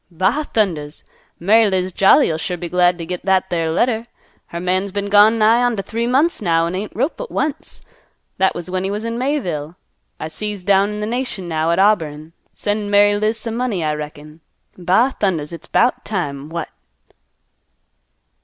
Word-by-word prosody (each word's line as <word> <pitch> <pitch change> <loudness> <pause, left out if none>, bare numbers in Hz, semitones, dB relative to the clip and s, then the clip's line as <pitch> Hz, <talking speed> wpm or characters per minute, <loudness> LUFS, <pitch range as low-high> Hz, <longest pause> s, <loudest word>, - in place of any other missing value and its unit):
"Ba 190 - 0
thundas! 160 -9 -1 0.4
Mary 215 +4 +4
Liz 185 -1 -1
Jolly'll 190 - +4
sure 180 +2 -3
be 175 - -5
glad 180 0 +2
t' 170 - -6
git 180 +1 -5
that 190 0 +1
there 165 -2 0
letter. 225 +6 0 0.4
Her 170 - -6
man's 185 +2 -1
been 200 +1 -3
gone 210 +2 +6
nigh 225 +2 +4
onto 240 -5 0
three 230 +3 -2
months 280 +6 +2
now, 165 -4 +2
an' 170 - -3
ain't 200 +3 -5
wrote 270 +8 0
but - - -7
once. 295 +1 -4 0.6
That 190 0 +2
was 175 - -6
when 185 0 -2
he 190 - -1
was 210 +2 -3
in 230 +1 -3
Mayville. 180 - -2 0.4
I - - -4
see 210 +6 -4
he's 205 -3 -6
down 200 +1 +3
in 210 0 -5
th' 210 - -2
nation 240 -5 -3
now 160 -1 0
at 170 - +2
Auburn, 165 -6 +1 0.2
sendin' 205 0 -2
Mary 205 0 +5
Liz 215 +2 0
some 225 0 -4
money, 235 -8 -1
I 155 -1 0
reckon. 150 +1 -8 0.3
Ba 190 +9 +2
thundas, 170 -6 -1
it's 170 - -9
'bout 245 - +2
time! 145 -8 -4
What!" 165 -1 -4
190 Hz, 185 wpm, -19 LUFS, 170-220 Hz, 0.6 s, gone